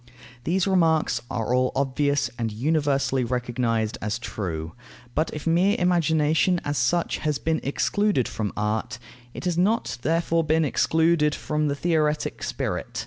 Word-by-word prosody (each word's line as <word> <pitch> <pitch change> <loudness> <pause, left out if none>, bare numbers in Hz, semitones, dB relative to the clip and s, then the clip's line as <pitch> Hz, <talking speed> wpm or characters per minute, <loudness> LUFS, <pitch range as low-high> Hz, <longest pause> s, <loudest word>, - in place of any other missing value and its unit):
These 185 +2 +1
remarks 160 -10 +2
are 120 0 -2
all 130 0 +2
obvious 140 -1 0
and 115 -2 -1
universally 140 +1 +1
recognized 120 -2 -1
as 105 +2 -2
true. 85 -9 -5 0.4
But 155 +2 0
if 150 - -7
mere 180 +5 +3
imagination 165 0 +2
as 145 -2 -1
such 170 +8 +1
has 150 -2 -1
been 160 0 -1
excluded 200 - +1
from 105 -2 -3
art, 105 +3 -2 0.4
it - - -6
has 175 -1 0
not 200 - +1
therefore 165 +3 +1
been 160 +1 +2
excluded 160 +1 +2
from 150 0 -1
the 140 - 0
theoretic 155 -1 0
spirit. - - -3
150 Hz, 140 wpm, -25 LUFS, 125-165 Hz, 0.4 s, mere